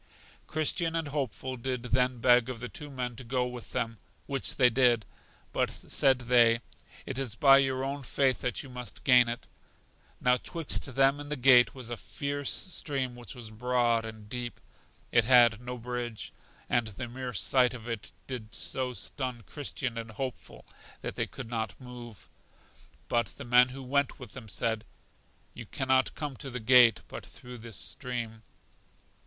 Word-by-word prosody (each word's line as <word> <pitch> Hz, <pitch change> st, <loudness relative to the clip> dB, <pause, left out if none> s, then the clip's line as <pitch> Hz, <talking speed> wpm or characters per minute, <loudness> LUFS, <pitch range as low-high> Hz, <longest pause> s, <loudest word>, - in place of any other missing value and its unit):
Christian 160 Hz, +2 st, 0 dB
and 165 Hz, -3 st, -1 dB
Hopeful 130 Hz, -2 st, -3 dB
did 125 Hz, 0 st, -3 dB
then 125 Hz, +1 st, +2 dB
beg 120 Hz, 0 st, +5 dB
of 125 Hz, -3 st, -5 dB
the 125 Hz, +1 st, -5 dB
two 150 Hz, -6 st, -8 dB
men 125 Hz, -3 st, -4 dB
to 125 Hz, -, -7 dB
go 125 Hz, +1 st, 0 dB
with 125 Hz, -1 st, -7 dB
them; 115 Hz, -1 st, -2 dB, 0.3 s
which 135 Hz, -2 st, -2 dB
they 125 Hz, -, +6 dB
did. 120 Hz, -3 st, +4 dB, 0.5 s
But, -, -, +1 dB
said 135 Hz, -2 st, +2 dB
they, 120 Hz, -1 st, +5 dB, 0.4 s
It 135 Hz, 0 st, -3 dB
is 125 Hz, -5 st, -3 dB
by 135 Hz, +2 st, +7 dB
your 130 Hz, -1 st, +1 dB
own 140 Hz, +1 st, -3 dB
faith 135 Hz, 0 st, +1 dB
that 125 Hz, +2 st, -1 dB
you 135 Hz, -, -11 dB
must 125 Hz, -3 st, -8 dB
gain 125 Hz, -2 st, +6 dB
it. 120 Hz, -, -5 dB, 0.7 s
Now 125 Hz, 0 st, +4 dB
'twixt 165 Hz, +1 st, -3 dB
them 135 Hz, +1 st, +4 dB
and 145 Hz, 0 st, -7 dB
the 150 Hz, -, -1 dB
gate 125 Hz, -2 st, +6 dB
was 125 Hz, -3 st, -7 dB
a 120 Hz, -, -3 dB
fierce 140 Hz, +4 st, -3 dB
stream 135 Hz, -8 st, -1 dB
which 120 Hz, +2 st, -8 dB
was 115 Hz, -3 st, -9 dB
broad 120 Hz, 0 st, +1 dB
and 110 Hz, -2 st, -9 dB
deep; 120 Hz, +1 st, -5 dB, 0.5 s
it 115 Hz, -, +5 dB
had 120 Hz, -3 st, +6 dB
no 125 Hz, 0 st, -5 dB
bridge, 120 Hz, -1 st, -4 dB, 0.3 s
and 120 Hz, -2 st, +1 dB
the 110 Hz, +4 st, -6 dB
mere 125 Hz, +1 st, -5 dB
sight 125 Hz, +3 st, +2 dB
of 115 Hz, -1 st, -9 dB
it 115 Hz, -3 st, -5 dB
did 110 Hz, -6 st, -7 dB
so 130 Hz, -1 st, -2 dB
stun 125 Hz, -2 st, -4 dB
Christian 130 Hz, +1 st, -4 dB
and 115 Hz, 0 st, -6 dB
Hopeful 110 Hz, -, -6 dB, 0.4 s
that -, -, -4 dB
they -, -, -1 dB
could -, -, -8 dB
not 110 Hz, -3 st, -3 dB
move. 120 Hz, -3 st, -10 dB, 0.8 s
But 120 Hz, 0 st, +1 dB
the 140 Hz, -, -7 dB
men 125 Hz, +1 st, +6 dB
who 135 Hz, +1 st, -8 dB
went 140 Hz, +2 st, +1 dB
with 125 Hz, -, -10 dB
them 120 Hz, -5 st, -9 dB
said: 110 Hz, +2 st, -1 dB, 0.7 s
You -, -, -9 dB
can 130 Hz, -, -4 dB
not 130 Hz, 0 st, +3 dB
come 145 Hz, -3 st, -4 dB
to 140 Hz, -, -6 dB
the 125 Hz, -1 st, -4 dB
gate 120 Hz, -1 st, +6 dB
but -, -, -8 dB
through 125 Hz, -1 st, -11 dB
this 115 Hz, -1 st, -8 dB
stream. 120 Hz, -4 st, -3 dB
125 Hz, 175 wpm, -30 LUFS, 115-130 Hz, 0.8 s, by